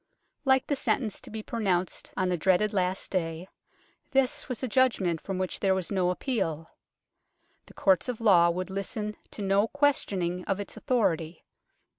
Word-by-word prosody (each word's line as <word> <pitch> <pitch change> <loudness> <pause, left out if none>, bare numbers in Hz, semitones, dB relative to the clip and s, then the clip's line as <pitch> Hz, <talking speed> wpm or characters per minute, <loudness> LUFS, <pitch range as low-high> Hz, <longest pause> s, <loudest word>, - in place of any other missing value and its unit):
Like 265 -1 +4
the 285 - 0
sentence 235 -5 -1
to - - -10
be 215 0 -6
pronounced 190 -6 -1
on 185 -1 +1
the 180 - +1
dreaded 190 +5 +2
Last 185 -1 -1
Day, 165 -1 -2 0.6
this 270 +2 +1
was 250 +1 -4
a - - +1
judgment 205 -9 +2
from 195 -2 -4
which 185 -1 -3
there 190 -2 +2
was 190 0 -3
no 185 -3 +2
appeal. 180 - -2 1.0
The - - -16
courts 190 +5 +3
of 245 - -3
law 180 -7 +6
would 185 +2 -3
listen 210 +2 -4
to 210 - -7
no 200 +2 +3
questioning 195 -11 0
of 195 0 -1
its 200 - -6
authority. 170 -9 0
195 Hz, 165 wpm, -28 LUFS, 180-230 Hz, 1.0 s, law